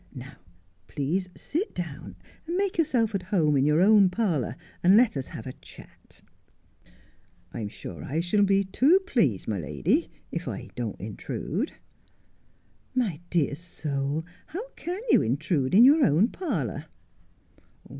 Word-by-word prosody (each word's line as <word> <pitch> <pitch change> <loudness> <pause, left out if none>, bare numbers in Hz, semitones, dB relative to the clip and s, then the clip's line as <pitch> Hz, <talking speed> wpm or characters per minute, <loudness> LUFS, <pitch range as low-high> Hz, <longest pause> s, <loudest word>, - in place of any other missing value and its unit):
Now, 130 +2 -9 0.5
please, 175 +7 -2
sit 355 +9 -3
down, 145 - -6 0.3
and 345 +2 -1
make 390 -3 -1
yourself 245 -9 +2
at 195 - -1
home 170 -5 +1
in 135 +1 +3
your 150 +1 +3
own 205 -1 +6
parlour, 175 - -1 0.3
and 185 +4 +6
let 240 -6 +4
us 135 -2 -3
have 110 - -8
a 130 - -6
chat.' - - -16 0.6
' 90 0 -31
I'm 105 -3 -4
sure 85 -6 -9
I 150 +5 -2
shall 180 +5 +1
be 195 0 +4
too 275 - +4
pleased, 385 - 0
my - - -1
lady, 330 - 0 0.2
if - - -4
I - - -5
don't - - -4
intrude.' - - -4 0.7
' - - -38
My 170 -8 -5
dear 155 -5 +1
soul, 150 -2 -3 0.2
how 420 +10 -6
can 360 -3 -6
you - - +6
intrude 140 +4 0
in 225 - +9
your 290 +4 +7
own 170 - +4
parlour 185 - -3
180 Hz, 150 wpm, -27 LUFS, 140-235 Hz, 0.7 s, in